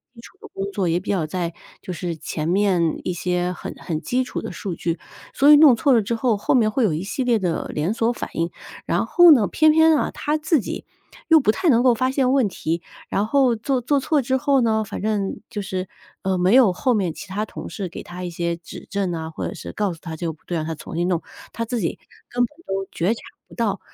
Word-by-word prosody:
基 230 Hz, -, -13 dB
础 350 Hz, -, -15 dB
的 430 Hz, -, -11 dB
工 195 Hz, -, -4 dB
作， 195 Hz, -2 st, -1 dB
也 165 Hz, 0 st, +2 dB
比 180 Hz, -, -6 dB
较 180 Hz, -6 st, 0 dB
在 170 Hz, 0 st, -3 dB, 0.3 s
就 -, -, -6 dB
是 175 Hz, -1 st, -4 dB
前 155 Hz, 0 st, -4 dB
面 180 Hz, -3 st, +1 dB
一 -, -, -1 dB
些 180 Hz, 0 st, -1 dB
很 180 Hz, -, -7 dB
很 160 Hz, -4 st, -4 dB
基 250 Hz, +9 st, 0 dB
础 250 Hz, -, -5 dB
的 -, -, -5 dB
数 195 Hz, -4 st, -5 dB
据， 170 Hz, +1 st, -2 dB, 0.4 s
所 285 Hz, +2 st, +6 dB
以 300 Hz, -, +10 dB
弄 290 Hz, -5 st, +8 dB
错 275 Hz, +5 st, +2 dB
了 235 Hz, -3 st, +5 dB
之 225 Hz, +3 st, -2 dB
后， 230 Hz, -2 st, +1 dB
后 205 Hz, -, +1 dB
面 220 Hz, -4 st, +3 dB
会 245 Hz, +2 st, +2 dB
有 185 Hz, -, +1 dB
一 160 Hz, +4 st, -3 dB
系 250 Hz, +6 st, -3 dB
列 240 Hz, -2 st, +3 dB
的 180 Hz, -5 st, -2 dB
连 155 Hz, +7 st, 0 dB
锁 230 Hz, +1 st, +1 dB
反 -, -, -6 dB
应。 165 Hz, +1 st, 0 dB, 0.4 s
然 -, -, 0 dB
后 350 Hz, -1 st, +7 dB
呢， 245 Hz, -8 st, +6 dB
偏 310 Hz, +8 st, +4 dB
偏 320 Hz, 0 st, +5 dB
啊， -, -, 0 dB
他 300 Hz, +1 st, -1 dB
自 310 Hz, 0 st, +2 dB
己， -, -, -6 dB, 0.4 s
又 325 Hz, -1 st, +7 dB
不 215 Hz, -, +3 dB
太 355 Hz, -, -2 dB
能 240 Hz, -3 st, +4 dB
够 255 Hz, -2 st, +5 dB
发 255 Hz, +3 st, 0 dB
现 265 Hz, -2 st, +2 dB
问 265 Hz, -5 st, +3 dB
题， 165 Hz, -2 st, -3 dB, 0.3 s
然 200 Hz, -, 0 dB
后 260 Hz, -1 st, +3 dB
做 260 Hz, +4 st, 0 dB
做 280 Hz, +4 st, +2 dB
错 290 Hz, +2 st, +1 dB
之 260 Hz, +1 st, 0 dB
后 275 Hz, 0 st, +2 dB
呢， 220 Hz, -2 st, +2 dB
反 -, -, -6 dB
正 205 Hz, -2 st, -1 dB
就 210 Hz, -, -4 dB
是， 185 Hz, -1 st, -4 dB, 0.4 s
呃， 190 Hz, -1 st, 0 dB
没 180 Hz, +3 st, +3 dB
有 240 Hz, -8 st, +6 dB
后 255 Hz, +7 st, +1 dB
面 190 Hz, -7 st, 0 dB
其 205 Hz, -, -9 dB
他 205 Hz, +3 st, -2 dB
同 -, -, -8 dB
事 195 Hz, -3 st, -4 dB
给 175 Hz, -, -8 dB
他 180 Hz, +1 st, -8 dB
一 180 Hz, -, -3 dB
些 170 Hz, 0 st, -2 dB
指 170 Hz, -, -11 dB
证 200 Hz, -1 st, -1 dB
呐， 160 Hz, -1 st, -4 dB
或 -, -, -3 dB
者 -, -, -5 dB
是 -, -, -8 dB
告 205 Hz, -3 st, -1 dB
诉 165 Hz, -, -13 dB
他 165 Hz, -2 st, -6 dB
这 165 Hz, -, -5 dB
个 165 Hz, -, -2 dB
不 155 Hz, -, -22 dB
对， 175 Hz, -, -2 dB
让 155 Hz, -, -2 dB
他 160 Hz, 0 st, -3 dB
重 150 Hz, +1 st, -9 dB
新 175 Hz, +1 st, +1 dB
弄， 175 Hz, -2 st, 0 dB, 0.3 s
他 230 Hz, -, -3 dB
自 235 Hz, +1 st, -2 dB
己 175 Hz, -, -2 dB, 0.3 s
根 245 Hz, 0 st, +1 dB
本 -, -, +1 dB, 0.2 s
都 195 Hz, 0 st, -2 dB
觉 185 Hz, +7 st, +1 dB
察 235 Hz, -, -9 dB, 0.3 s
不 -, -, -15 dB
到。 210 Hz, -5 st, 0 dB
205 Hz, 280 characters per minute, -22 LUFS, 175-250 Hz, 0.4 s, 以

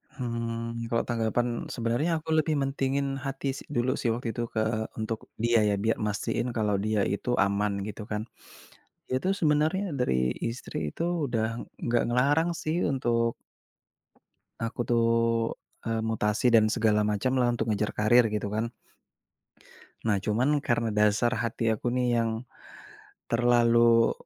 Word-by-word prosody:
Hmm, 115 Hz, -2 st, -3 dB
kalau 115 Hz, 0 st, +1 dB
tanggapan, 120 Hz, +1 st, -1 dB
sebenarnya 120 Hz, +9 st, 0 dB
aku 160 Hz, -, -9 dB
lebih 155 Hz, 0 st, +2 dB
mentingin 135 Hz, 0 st, -1 dB
hati 135 Hz, 0 st, -3 dB
si -, -, -9 dB
dulu 130 Hz, -2 st, 0 dB
sih -, -, -1 dB
waktu 115 Hz, 0 st, -3 dB
itu 120 Hz, +2 st, -3 dB
ke 110 Hz, 0 st, 0 dB
untuk 110 Hz, 0 st, -4 dB
dia 115 Hz, 0 st, +2 dB
ya 100 Hz, -, +2 dB
bia 110 Hz, 0 st, +2 dB
mastiin 105 Hz, +3 st, -1 dB
kalau 105 Hz, -3 st, +1 dB
dia 110 Hz, -2 st, +1 dB
itu 100 Hz, +6 st, -2 dB
aman 100 Hz, 0 st, +1 dB
gitu 105 Hz, 0 st, -7 dB
kan. 105 Hz, 0 st, -1 dB, 0.9 s
Dia 130 Hz, -, 0 dB
tuh 190 Hz, -, +1 dB
sebenarnya 155 Hz, +5 st, +2 dB
dari 65 Hz, -, +1 dB, 0.2 s
istri 120 Hz, -, -7 dB
itu 165 Hz, -, -5 dB, 0.3 s
udah 115 Hz, -2 st, 0 dB, 0.4 s
gak 120 Hz, 0 st, +3 dB
ngelarang 145 Hz, +7 st, +3 dB
sih 155 Hz, +1 st, -1 dB, 0.2 s
untuk 115 Hz, -3 st, +1 dB, 1.3 s
aku 115 Hz, +1 st, -3 dB
tuh, 115 Hz, -1 st, +3 dB, 0.8 s
eee, 115 Hz, -1 st, -1 dB
mutasi 110 Hz, +1 st, +1 dB
dan 110 Hz, -2 st, +6 dB
segala 105 Hz, -3 st, +2 dB
macam 105 Hz, +5 st, 0 dB
lah 120 Hz, -1 st, +3 dB
untuk 115 Hz, -1 st, -2 dB
ngejar 105 Hz, 0 st, 0 dB
karir 120 Hz, +3 st, +4 dB
gitu 105 Hz, -1 st, -2 dB
kan. 110 Hz, +3 st, -2 dB, 1.3 s
Nah 105 Hz, -3 st, +2 dB
cuman 115 Hz, +6 st, +2 dB
karena 120 Hz, -4 st, 0 dB
dasar 105 Hz, +3 st, +3 dB
hati 115 Hz, 0 st, 0 dB
aku 110 Hz, -, -4 dB
nih 125 Hz, -1 st, +1 dB, 0.2 s
yang, 115 Hz, -1 st, 0 dB, 1.0 s
terlalu, 115 Hz, -1 st, +4 dB
115 Hz, 145 wpm, -28 LUFS, 110-125 Hz, 1.3 s, dan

